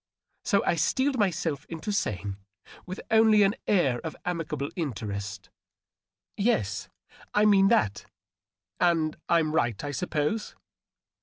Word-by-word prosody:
So 200 -4 +2
I - - +3
steeled 260 - +1
myself 165 -7 0
into 165 +5 -4
saying, 100 - -2 0.5
with 185 +2 -6
only 220 -1 +6
an 195 +1 +3
air 140 -12 +2
of 160 - -6
amicable 165 -5 -3
interest, 105 - -5 0.3
— - - -66
" - - -66
Yes, 100 - 0 0.5
I 210 +1 +5
mean 195 -2 +6
that. 195 - +1 0.7
And 165 -3 +2
I'm 165 -2 +3
right, 120 -10 0
I 145 - -3
suppose 150 - -2
160 Hz, 130 wpm, -27 LUFS, 120-200 Hz, 0.7 s, only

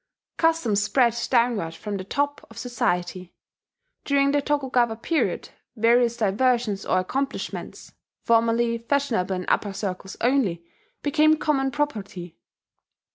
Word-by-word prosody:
Customs 325 -11 +2
spread 240 +1 +3 0.2
downward 230 -10 +1
from 205 +3 -5
the 185 - -5
top 285 +8 -2
of - - -15
society. 185 -7 -2 0.7
During 280 0 +2
the 290 0 +2
Tokugawa 260 -5 +1
period, 310 +8 -1 0.3
various 235 +1 +3
diversions 220 0 +1
or - - +2
accomplishments, 270 +9 -4 0.3
formerly 230 0 +2
fashionable 230 -7 0
in 180 0 -4
upper 200 -2 +1
circles 190 -1 -5
only, 225 -10 +1 0.4
became 310 +1 +4
common 275 -3 +1
property. 200 - -4
235 Hz, 115 wpm, -24 LUFS, 200-275 Hz, 0.7 s, became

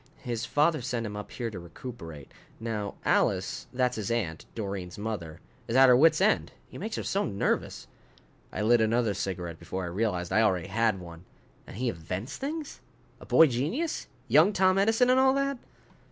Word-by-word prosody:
His 120 -2 -3
father 155 0 +2
sent 120 -1 -2
him 105 -1 -5
up 105 0 -7
here 115 -2 -4
to 95 - -7
recuperate. 85 - -9 0.3
Now 110 -3 -4
Alice - - +1
that's 125 -1 0
his 105 -3 -3
aunt, 95 -10 -2
Doreen's 100 -4 -5
mother 95 -7 -5 0.3
is 115 - -2
at 135 0 +7
her 125 - +8
wits' 155 +4 +5
end, 210 +3 +2
he - - -10
makes 215 +4 -4
her - - -3
so 200 +1 0
nervous." 100 - -1 0.7
I - - -3
lit 115 +1 +4
another 110 -1 +2
cigarette 90 -4 -4
before 95 0 -5
I - - -3
realized 90 -2 -1
I 110 - +4
already 95 -4 +1
had 110 -1 +1
one. 85 0 -11 0.4
"And - - -9
he 125 +2 -1
invents 90 +4 -4
things? 295 +2 -5 0.4
A - - -13
boy 165 - +7
genius? 155 - -2 0.2
Young 155 - +5
Tom 190 0 +3
Edison 225 +5 +4
and 255 - +4
all 265 0 +4
that?" 275 -1 0
115 Hz, 180 wpm, -28 LUFS, 95-155 Hz, 0.7 s, her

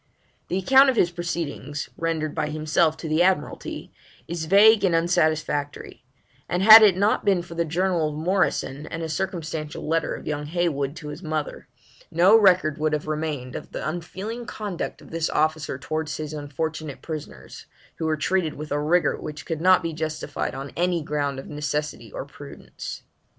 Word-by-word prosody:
The 180 - -1
account 265 +8 +6
of 260 - +1
his 175 -6 +3
proceedings, 165 -4 -4
rendered 160 -2 -2
by 155 -2 -1
himself 155 +1 +1
to 160 - -6
the 155 +2 +2
Admiralty, 180 -4 -1 0.4
is 170 -1 -4
vague 205 +5 +6
and 180 -4 +3
unsatisfactory; 155 -5 0 0.5
and 180 +2 0
had 220 +2 +11
it 200 -4 +6
not 205 +3 +2
been 190 -4 +2
for 170 - -10
the 170 0 0
journal 170 -1 0
of 150 - -7
Morrison, 155 -4 0
and 165 0 -5
a - - -2
circumstantial 160 -3 -4
letter 165 0 0
of - - -10
young 150 -1 -3
Heywood 155 -4 -1
to 150 - -8
his 150 +4 -8
mother, 155 -3 -4 0.4
no 180 +6 +5
record 185 -8 +4
would 155 0 0
have 150 - -1
remained 150 -4 -3
of - - -8
the - - -4
unfeeling 195 +8 -5
conduct 205 -5 -5
of - - -15
this 165 -1 -1
officer 155 -3 0
towards 155 +3 -3
his 155 0 -5
unfortunate 155 0 -5
prisoners, 155 -3 -8 0.3
who 160 - -2
were 155 -1 +1
treated 170 0 0
with 150 +1 -8
a 145 0 0
rigour 170 +4 +1
which 150 0 -7
could 160 -1 -3
not 185 +1 +5
be 165 -1 -3
justified 155 -3 -3
on 135 +1 -6
any 175 -1 0
ground 145 -2 -2
of 135 - -8
necessity 150 0 -4
or - - -6
prudence. - - -9
160 Hz, 175 wpm, -24 LUFS, 150-175 Hz, 0.5 s, had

